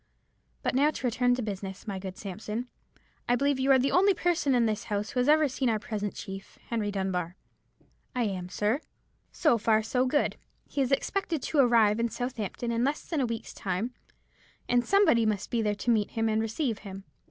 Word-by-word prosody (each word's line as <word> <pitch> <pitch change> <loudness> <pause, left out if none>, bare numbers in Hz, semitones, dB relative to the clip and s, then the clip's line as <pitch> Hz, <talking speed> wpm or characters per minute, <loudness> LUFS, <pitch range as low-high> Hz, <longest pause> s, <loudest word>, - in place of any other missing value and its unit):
But - - 0
now 280 +4 +4
to 305 - -5
return 245 +1 +2
to 250 - -3
business, 195 -2 -5
my 195 -2 -3
good 185 -1 -7
Sampson. 215 +4 -5 0.6
I 245 - +5
believe 280 +1 +1
you 265 +1 +1
are 265 - +7
the 260 +2 +1
only 390 +2 +4
person 340 -7 +1
in 240 -1 +3
this 215 0 -1
house 205 -1 -2
who 250 - -1
has 250 +3 +2
ever 305 0 +5
seen 260 -1 -1
our 220 - +2
present 210 -2 -4
chief, 195 0 -8
Henry 220 -3 -1
Dunbar." 185 -3 -2 0.8
"I 250 - +1
am, 185 -4 -3
sir." 210 +8 0 0.5
"So 295 -8 +2
far 220 0 +3
so 250 +3 +1
good. 290 +3 +1 0.3
He 280 - -2
is 265 0 0
expected 325 +2 0
to 305 - 0
arrive 230 -4 +5
at 235 0 0
Southampton 240 -2 -3
in 230 +1 +1
less 285 +3 -1
than 315 -5 0
a 255 - +1
week's 230 -1 -5
time, 200 +6 -3 0.7
and 245 0 +3
somebody 395 - +4
must 210 -2 -1
be 235 - +1
there 210 -1 0
to 235 +4 0
meet 215 -3 +2
him 225 0 0
and 220 0 +1
receive 225 +1 -1
him. 195 -1 -9
230 Hz, 205 wpm, -28 LUFS, 210-260 Hz, 0.8 s, are